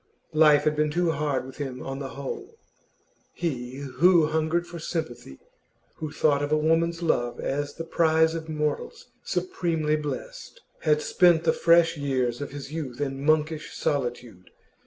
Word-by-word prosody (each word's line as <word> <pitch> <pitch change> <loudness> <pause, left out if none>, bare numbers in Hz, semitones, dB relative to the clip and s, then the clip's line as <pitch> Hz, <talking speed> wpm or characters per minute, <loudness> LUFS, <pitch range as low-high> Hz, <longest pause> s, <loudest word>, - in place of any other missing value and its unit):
Life 155 -1 +6
had 155 0 +1
been 150 0 +1
too 170 +2 +1
hard 145 -3 -1
with 130 - -11
him 135 -3 -5
on 135 0 -5
the 135 -2 -6
whole. 375 - -6 0.8
He, 130 -7 -3
who 145 +5 +3
hungered 160 +2 0
for 175 -1 -9
sympathy, 155 - -5 0.6
who 155 -2 -5
thought 145 -2 +2
of 145 0 -2
a 155 - +4
woman's 165 +2 +1
love 120 -7 0
as 145 +1 -3
the 165 - -5
prize 160 -1 +3
of 160 -1 -5
mortals 155 - -3
supremely 165 - -1
blessed, - - -6 0.2
had 150 -1 +2
spent 175 -3 +4
the - - +3
fresh 165 -1 +4
years 130 -3 -1
of 145 - -4
his 140 +1 -8
youth 140 -6 -5
in 135 -1 -3
monkish 155 0 0
solitude. 120 - -3
150 Hz, 155 wpm, -26 LUFS, 140-165 Hz, 0.8 s, Life